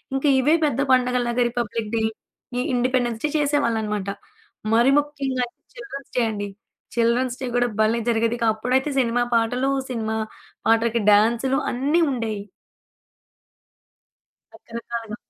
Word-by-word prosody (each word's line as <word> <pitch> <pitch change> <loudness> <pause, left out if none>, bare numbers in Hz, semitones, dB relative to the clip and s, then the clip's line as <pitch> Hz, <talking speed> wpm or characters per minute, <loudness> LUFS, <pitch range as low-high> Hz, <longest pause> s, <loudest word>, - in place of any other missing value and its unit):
ఇంక 270 - -1
ఇవే 295 +5 +4
పెద్ద 290 -2 0
పండగల్లాగా 250 -1 +2
రిపబ్లిక్ 230 -2 -3
డే, 225 - +1 0.6
ఈ - - +1
ఇండిపెండెన్స్ 245 -2 0
డే 300 - +1
చేసేవాళ్ళనమాట. 225 -9 0 0.6
మరి 235 +3 +5
ముఖ్యంగా 280 -3 -2
అయితే 240 - -24
చిల్డ్రన్స్ 405 - -9
డే - - +4
అండి. 205 -1 -4 0.5
చిల్డ్రన్స్ 240 +2 +1
డే 260 - -2
గూడా 245 0 +3
భలే 220 +2 +2
జరిగేది. 230 0 +1
ఇక 230 - +1
అప్పుడైతే, 255 +6 0
సినిమా 240 -1 +2
పాటలు, 245 +4 +1 0.2
సినిమా 220 -3 -2 0.5
పాటలకి 230 +1 +3
డాన్సులు, 235 +6 +3
అన్నీ 285 +7 +1
ఉండేయి. 220 -5 -3 2.1
రకరకాల. 230 -1 -7
240 Hz, 120 wpm, -23 LUFS, 225-260 Hz, 2.1 s, మరి